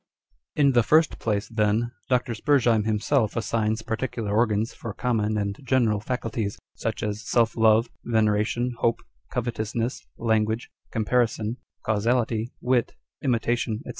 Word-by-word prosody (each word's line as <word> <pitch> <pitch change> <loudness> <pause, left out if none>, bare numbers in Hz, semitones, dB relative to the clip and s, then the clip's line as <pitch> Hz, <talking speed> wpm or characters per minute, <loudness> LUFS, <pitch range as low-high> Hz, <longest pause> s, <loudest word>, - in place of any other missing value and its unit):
l - - +2
In 140 - +5
the 120 -2 +5
first 155 +7 +3
place, 105 -2 -1
then, 110 +1 +1 0.2
Dr. 125 -2 +1
Spurzheim 115 -3 +3
himself 110 +2 +1
assigns 110 -1 0
particular 110 -2 -2
organs 110 -1 +1
for 115 -3 -7
common 110 -3 0
and 100 -1 -1
general 120 -6 +2
faculties 110 -2 -3
â€" - - -24 0.2
such - - -3
as 105 0 -2
self 115 0 +1
love, 110 +1 +4 0.2
veneration, 110 +2 +1
hope, 115 - +1 0.3
covetousness, 115 0 -2
language, 110 0 0 0.2
com 110 -1 -1
parison, 115 -1 +1 0.3
causality, 115 +1 0
wit, 125 -1 +1 0.3
imitation, 115 -3 0
&c. - - -9
115 Hz, 135 wpm, -25 LUFS, 110-120 Hz, 0.3 s, In